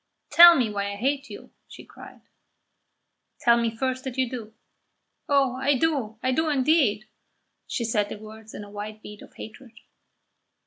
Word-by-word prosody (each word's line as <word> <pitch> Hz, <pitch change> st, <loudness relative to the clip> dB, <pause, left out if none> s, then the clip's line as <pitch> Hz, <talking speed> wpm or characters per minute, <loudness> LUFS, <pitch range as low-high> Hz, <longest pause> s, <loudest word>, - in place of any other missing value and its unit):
"Tell 345 Hz, 0 st, +9 dB
me 250 Hz, -6 st, +1 dB
why 200 Hz, 0 st, -3 dB
I -, -, -7 dB
hate 275 Hz, +6 st, -2 dB
you!" -, -, -11 dB, 0.2 s
she -, -, -13 dB
cried. -, -, -14 dB, 1.2 s
"Tell 235 Hz, -1 st, +5 dB
me 235 Hz, -1 st, 0 dB
first 255 Hz, +3 st, -3 dB
that 265 Hz, -1 st, -6 dB
you 260 Hz, -1 st, +1 dB
do." 225 Hz, -3 st, -8 dB, 0.7 s
"Oh, 275 Hz, -3 st, +2 dB
I 270 Hz, +1 st, +1 dB
do, 255 Hz, -8 st, -1 dB
I 255 Hz, -, +1 dB
do 315 Hz, +4 st, 0 dB
indeed!" 265 Hz, -7 st, +2 dB, 0.6 s
She 235 Hz, -, -3 dB
said 210 Hz, -2 st, 0 dB
the -, -, -7 dB
words 220 Hz, +1 st, -13 dB
in -, -, -7 dB
a 205 Hz, -, -13 dB
white 210 Hz, +1 st, -7 dB
heat 210 Hz, 0 st, -11 dB
of -, -, -16 dB
hatred. 235 Hz, +2 st, -12 dB
240 Hz, 170 wpm, -25 LUFS, 215-270 Hz, 1.2 s, Tell